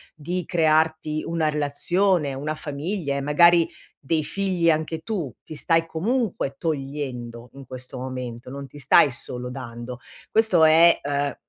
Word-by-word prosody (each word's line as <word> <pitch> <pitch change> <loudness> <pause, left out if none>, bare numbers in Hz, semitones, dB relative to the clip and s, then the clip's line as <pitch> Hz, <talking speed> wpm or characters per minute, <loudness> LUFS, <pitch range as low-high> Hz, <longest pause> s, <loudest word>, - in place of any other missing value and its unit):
di 175 +4 -3
crearti 155 -1 +1
una 165 -2 0
relazione, 150 +2 +1
una 150 +3 -3
famiglia 150 +1 -3
e 140 - -2
magari 170 +4 +5 0.3
dei 155 +2 -1
figli 185 -1 0
anche 160 0 0
tu. 160 - -4
Ti 155 - -9
stai 165 +2 +2
comunque 185 - -1
togliendo, 135 -6 -4
in 135 0 -11
questo 130 +1 -7
momento, 125 -2 -6
non 140 0 -7
ti 145 - -14
stai 140 +2 +5
solo 125 +1 -6
dando. 125 -1 -7 0.3
Questo 220 -7 +4
è, 165 +2 +6
uhm, 145 0 -1
150 Hz, 140 wpm, -24 LUFS, 135-165 Hz, 0.3 s, è